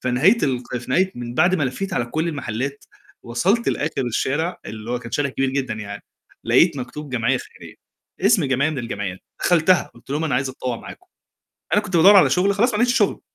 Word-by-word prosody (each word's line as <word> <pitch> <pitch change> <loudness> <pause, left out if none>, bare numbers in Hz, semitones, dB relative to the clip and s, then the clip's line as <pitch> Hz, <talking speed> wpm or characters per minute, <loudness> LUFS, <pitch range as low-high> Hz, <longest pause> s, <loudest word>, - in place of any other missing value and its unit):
في 125 - -1
نهاية 170 - +4
ال 125 -3 0 0.2
في 125 - -10
نهاية 185 +7 +2
من 120 0 -6
بعد 180 +6 +3
ما 175 - 0
لفّيت 190 +10 -3
على 120 - 0
كُلّ 160 +7 -2
المحلات، 140 -1 -4 0.4
وصلت 185 - 0
لآخر 140 -4 -1
الشارع، 145 +9 -1
اللي 110 +1 -7
هو 125 - -1
كان 115 -1 -10
شارع 145 -1 0
كبير 135 0 -1
جدًا 135 -3 -2
يعني، 100 -2 -7 0.4
لقيت 145 +8 +4
مكتوب 135 +3 -7
جمعية 115 -3 +1
خيرية، - - -12 0.5
اسم 195 -3 +4
جمعية 135 +3 +1
من 145 - -4
الجمعيات، 100 -6 -4 0.2
دخلتها، 175 +1 +3
قلت 120 +3 -17
لهم 150 +3 -1
أنا 145 -5 0
عايز 130 +1 0
أتطوّع 130 -2 -4
معاكم، - - -12 0.7
أنا 205 - +4
كنت 190 -4 -4
بادوّر 190 +5 +7
على 195 - +7
شغل 195 +2 +2
خلاص 230 +5 +2
ما - - 0
لقيتش 245 +1 +3
شغل. - - +1
140 Hz, 205 wpm, -21 LUFS, 125-180 Hz, 0.7 s, بادوّر